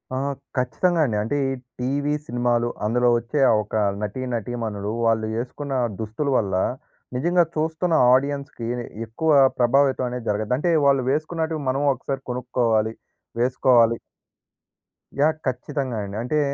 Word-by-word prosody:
ఆహా! 135 Hz, +2 st, -1 dB, 0.3 s
ఖచ్చితంగా 165 Hz, +8 st, +1 dB
అండి. 115 Hz, -, -1 dB
అంటే 120 Hz, +7 st, -1 dB
ఈ -, -, 0 dB, 0.3 s
టీవీ, 140 Hz, +4 st, 0 dB
సినిమాలు 120 Hz, 0 st, +1 dB, 0.2 s
అందులో 120 Hz, +3 st, +2 dB
వచ్చే 120 Hz, +5 st, -2 dB
ఆ -, -, +5 dB
ఒక 105 Hz, -, -19 dB, 0.3 s
నటి, 105 Hz, +5 st, -3 dB
నటీమణులు 110 Hz, -3 st, -3 dB
వాళ్ళు 110 Hz, -1 st, +2 dB
యేసుకున్న 135 Hz, +4 st, -4 dB, 0.3 s
దుస్తుల 110 Hz, +7 st, -3 dB
వల్ల, 95 Hz, -4 st, 0 dB, 0.6 s
నిజంగా 175 Hz, +7 st, +3 dB
చూస్తున్న 160 Hz, +2 st, 0 dB, 0.2 s
ఆడియన్స్‌కి 140 Hz, -3 st, -1 dB, 0.4 s
ఎక్కువ 155 Hz, +8 st, 0 dB, 0.3 s
ప్రభావితం 130 Hz, +1 st, +3 dB
అనేది 125 Hz, -1 st, -6 dB
జరగద్ది. 105 Hz, +3 st, 0 dB
అంటే 170 Hz, +5 st, +1 dB
వాళ్ళు 135 Hz, -2 st, +4 dB
వేసుకున్నటివి 160 Hz, +1 st, -2 dB
మనము 135 Hz, +3 st, 0 dB
ఒకసారి 135 Hz, +1 st, -5 dB
కొనుక్కోవాలి. 115 Hz, -3 st, 0 dB, 0.5 s
వేసుకోవాలి. 120 Hz, -2 st, +4 dB, 1.2 s
యాహ్! 155 Hz, +2 st, +4 dB
ఖచ్చితంగా 130 Hz, 0 st, -2 dB
అండి. 100 Hz, 0 st, -7 dB
అంటే 140 Hz, +6 st, 0 dB
125 Hz, 125 wpm, -23 LUFS, 115-145 Hz, 1.2 s, ఆ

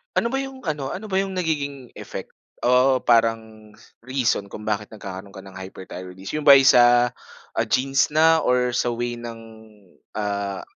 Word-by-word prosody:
Ano 235 Hz, -, +1 dB
ba 270 Hz, -, 0 dB
yung 270 Hz, -1 st, -7 dB
ano 145 Hz, -5 st, -3 dB
ano 210 Hz, +2 st, -8 dB
ba 190 Hz, -, +2 dB
yung 195 Hz, -1 st, -3 dB
nagiging 145 Hz, -7 st, -3 dB
effect, -, -, -8 dB, 0.3 s
o 125 Hz, +1 st, +3 dB
parang 110 Hz, -2 st, 0 dB, 0.2 s
reason 125 Hz, -5 st, -1 dB
kung 105 Hz, -, -9 dB
bakit 105 Hz, -1 st, -2 dB
nagkakaroon 100 Hz, -2 st, -9 dB
ka 95 Hz, -, -10 dB
ng 95 Hz, -1 st, -11 dB
hyperthyroidism? 95 Hz, +4 st, -7 dB
Yung 150 Hz, -, -6 dB
ba 140 Hz, -, +11 dB
ay 135 Hz, -, +6 dB
sa 120 Hz, -2 st, +5 dB, 0.6 s
genes 135 Hz, +1 st, +2 dB
na 160 Hz, +1 st, +5 dB
or 125 Hz, -3 st, +1 dB
sa 120 Hz, 0 st, -1 dB
way 120 Hz, 0 st, -3 dB
ng, 115 Hz, -1 st, -8 dB, 0.8 s
ah, 100 Hz, -2 st, -3 dB
120 Hz, 160 wpm, -23 LUFS, 105-140 Hz, 0.8 s, ba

